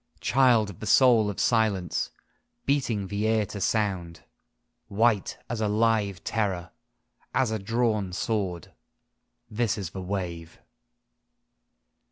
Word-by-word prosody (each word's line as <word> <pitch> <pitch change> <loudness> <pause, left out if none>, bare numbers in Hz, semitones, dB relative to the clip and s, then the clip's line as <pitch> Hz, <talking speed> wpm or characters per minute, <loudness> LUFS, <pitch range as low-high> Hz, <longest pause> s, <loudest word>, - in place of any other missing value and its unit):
Child 120 -5 +3
of 90 - -15
the 110 - -6
soul 120 -5 +5
of 100 - -5
silence, 105 -7 +1 0.6
beating 125 -8 0
the 105 +3 -2
air 110 -1 +2
to 100 0 -7
sound: 95 -6 -1 0.6
White 110 -1 +1
as 115 -2 -3
a 105 - +1
live 105 -2 +1
terror, 95 -6 -2 0.6
as 130 -4 +2
a 110 - -1
drawn 110 -2 0
sword, 95 -3 -3 0.7
This 110 0 -1
is 95 -5 -5
the 95 - -6
wave. 90 -3 -5
105 Hz, 120 wpm, -27 LUFS, 95-115 Hz, 0.7 s, soul